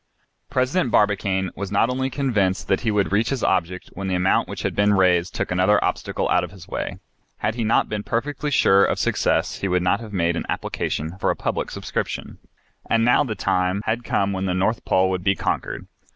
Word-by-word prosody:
President 130 +3 +1
Barbicane 100 -3 +1
was 100 0 -5
not 110 +4 +2
only 130 +1 -1
convinced 105 -10 0
that 95 - +1
he 115 - 0
would 105 -3 +1
reach 110 +3 +2
his 135 -4 -2
object 90 -1 -1
when 100 0 -5
the 95 - 0
amount 90 +1 +2
which - - -6
had - - -2
been 100 0 +3
raised 90 -2 +2
took - - -2
another 95 +4 +3
obstacle - - -2
out 90 - +3
of 90 - -5
his 95 -3 -13
way. - - -4 0.4
Had 105 +1 -1
he 115 0 -2
not 110 +2 +2
been 105 -1 -3
perfectly 140 +7 -2
sure 100 -8 +5
of - - +1
success - - 0
he 100 - -1
would 90 -1 +1
not 90 - +2
have 115 -2 -9
made 85 -3 0
an - - -4
application 80 +6 -3
for - - +1
a - - +1
public - - -2
subscription. - - -4 0.5
And 115 0 +3
now 125 +4 +4
the 115 -6 -4
time 90 +1 0
had 115 +2 -1
come 100 -3 0
when 95 0 -2
the 90 -1 0
North 100 +5 0
Pole 95 0 +3
would 90 -1 -2
be 95 0 +2
conquered. - - -3
100 Hz, 215 wpm, -22 LUFS, 95-115 Hz, 0.5 s, sure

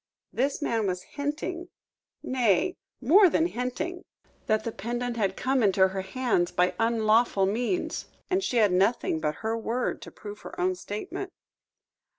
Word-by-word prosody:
This 275 +4 0
man 225 -5 0
was 180 -1 -2
hinting 310 +5 -4 0.5
nay, 255 - +2 0.3
more 360 - +7
than 320 +1 +2
hinting 320 +6 -3 0.4
that 215 0 +2
the 230 - -3
pendant 240 +4 -3
had 195 -4 0
come 265 0 +1
into 190 -2 +4
her 190 0 -3
hands 190 -3 0
by 180 +1 +2
unlawful 225 -2 +3
means, 240 - -1 0.2
and 380 +1 +1
she 250 - 0
had 210 -4 +5
nothing 190 -2 +2
but 150 -1 -1
her 225 +1 +1
word 230 +2 -2
to - - -9
prove 210 0 -9
her - - -10
own 185 +1 +2
statement. 210 - -6
230 Hz, 155 wpm, -27 LUFS, 195-270 Hz, 0.5 s, more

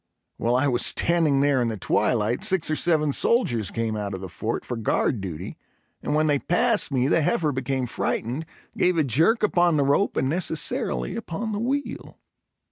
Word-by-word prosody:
While 120 +1 0
I 135 +3 +2
was 120 -3 +2
standing 160 -5 +2
there 140 -2 +2
in 120 - 0
the 110 -1 -3
twilight, 105 +4 0
six 185 -5 +1
or - - +1
seven 155 -3 +1
soldiers 120 - +1
came 115 0 -2
out 100 -2 -4
of 95 - -8
the 95 - -7
fort - - -4
for 120 - -4
guard 115 0 0
duty 90 -5 -7 0.4
and - - -2
when 155 +1 +2
they 145 -2 +2
passed 225 - +1
me 130 -1 +1
the 165 - +2
heifer 155 -1 +1
became 130 -1 -2
frightened, 125 +5 -3 0.3
gave 180 -1 +2
a 160 - +3
jerk 160 - +2
upon 175 -5 +3
the 145 - +2
rope 145 +9 +1
and 130 - +1
necessarily 145 - -1
upon 220 +7 -4
the 205 - -3
wheel. 275 +5 -4
145 Hz, 190 wpm, -24 LUFS, 120-170 Hz, 0.4 s, a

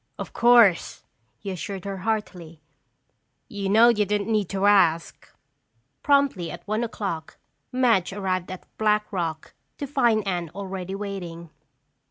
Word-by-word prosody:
"Of - - -7
course," 235 -6 +4 0.3
he 200 - -6
assured 190 +1 -6
her 195 -1 -4
heartily. 185 -6 -4 0.9
"You 200 -2 -4
know 225 +4 +6
you 210 -3 +2
didn't 205 +1 -1
need 210 -4 0
to 195 0 -1
ask." 175 -5 +2 0.7
Promptly 280 - +2
at - - -10
one 215 +3 -1
o'clock 195 -8 -5 0.3
Madge 235 -8 +2
arrived 185 -2 -2
at 185 -1 -8
Black 210 -1 +2
Rock 165 -4 -4 0.2
to 285 - -4
find 240 -6 +1
Anne 175 -3 -2
already 190 -1 -5
waiting. 175 -5 -7
200 Hz, 135 wpm, -24 LUFS, 180-215 Hz, 0.9 s, know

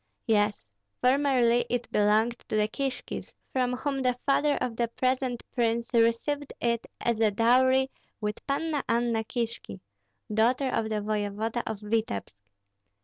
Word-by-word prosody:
"Yes. 210 - +1 0.3
Formerly 250 -3 +3
it 245 0 -2
belonged 215 +3 +2
to - - -1
the 210 0 +3
Kishkis, 270 +3 -4 0.2
from 250 -1 +1
whom 275 +1 -2
the 250 -1 +2
father 290 +1 +3
of 240 -2 -2
the 235 0 0
present 255 +1 -1
prince 235 -1 0
received 235 +5 +1
it 235 -1 0
as 235 -2 0 0.2
dowry 260 +3 +4 0.3
with 210 -1 -3
Panna 295 +1 -1
Anna 235 -1 +1
Kishki, 230 - -4 0.5
daughter 250 +5 +2
of 220 -1 0
the 215 -1 -1
voevoda 215 +2 -1
of 220 -2 -4
Vityebsk. 210 - -2
235 Hz, 135 wpm, -28 LUFS, 220-260 Hz, 0.5 s, dowry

